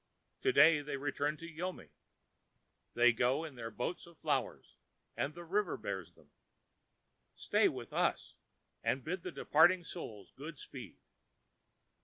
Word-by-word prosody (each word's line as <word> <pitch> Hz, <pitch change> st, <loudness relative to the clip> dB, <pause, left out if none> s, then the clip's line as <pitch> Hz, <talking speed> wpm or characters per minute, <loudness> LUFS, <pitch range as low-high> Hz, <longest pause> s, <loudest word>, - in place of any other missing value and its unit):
To 395 Hz, -, +3 dB
day 160 Hz, -, +7 dB
they 145 Hz, -1 st, -4 dB
return 145 Hz, +2 st, -1 dB
to 165 Hz, -, -8 dB
Yomi. 175 Hz, +3 st, -5 dB, 1.1 s
They 120 Hz, 0 st, +6 dB
go 125 Hz, +6 st, +2 dB
in 155 Hz, -3 st, -6 dB
their 120 Hz, -3 st, -6 dB
boats 120 Hz, -, -4 dB
of 170 Hz, -2 st, -16 dB
flowers, -, -, -2 dB, 0.4 s
the 160 Hz, +5 st, -3 dB
river 190 Hz, +2 st, 0 dB
bears 95 Hz, -4 st, -5 dB
them. 75 Hz, -3 st, -23 dB, 1.0 s
Stay -, -, +3 dB
with -, -, -5 dB
us -, -, 0 dB, 0.5 s
and 130 Hz, -, 0 dB
bid 180 Hz, +3 st, -3 dB
the -, -, -5 dB
departing 175 Hz, +4 st, +4 dB
Souls 110 Hz, -, -8 dB
good 150 Hz, +2 st, -8 dB
speed. -, -, -9 dB
150 Hz, 135 wpm, -34 LUFS, 120-170 Hz, 1.1 s, day